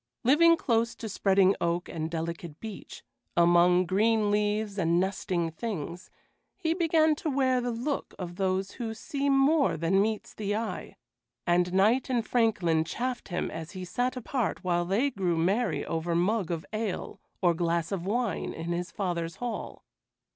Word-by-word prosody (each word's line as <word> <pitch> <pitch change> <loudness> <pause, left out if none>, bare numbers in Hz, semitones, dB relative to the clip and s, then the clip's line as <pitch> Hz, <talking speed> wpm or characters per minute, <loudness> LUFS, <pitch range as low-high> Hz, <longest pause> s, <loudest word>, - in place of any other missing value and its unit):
Living 335 +6 +6
close 230 -3 +1
to 225 - -6
spreading 195 -1 +3
oak 170 +1 0
and 160 -1 -4
delicate 165 -1 -5
beech, 220 -3 -9 0.3
among 175 +1 +5
green 210 +3 +2
leaves 210 0 0
and 170 -1 +2
nesting 180 -3 -1
things, 175 -3 -5 0.5
he 330 -4 0
began 320 -2 +3
to 305 +1 -3
wear 260 -2 +2
the 245 - -2
look 245 +5 -3
of 175 -1 -6
those 190 0 0
who 225 -2 -5
see 280 +5 -2
more 275 - +3
than 170 +5 +2
meets 215 0 -2
the 205 -1 -2
eye, 225 0 -4 0.5
and 175 0 +2
knight 215 +9 +3
and 240 -3 0
franklin 190 -9 +2
chaffed 245 +9 -3
him 175 -2 -2
as 160 +2 -7
he 185 -1 -6
sat 245 +8 -1
apart 250 -2 -2
while 175 -1 +1
they 220 +10 +1
grew 185 -7 0
merry 195 +9 +1
over 165 +1 -2
mug 190 +2 +1
of 165 -2 -3
ale 215 -3 -3 0.2
or 175 -2 +3
glass 170 0 -1
of 190 -4 -2
wine 220 0 -1
in 165 +1 -5
his 175 +1 -2
father's 170 -4 -3
hall. 240 -2 -5
195 Hz, 160 wpm, -28 LUFS, 175-235 Hz, 0.5 s, Living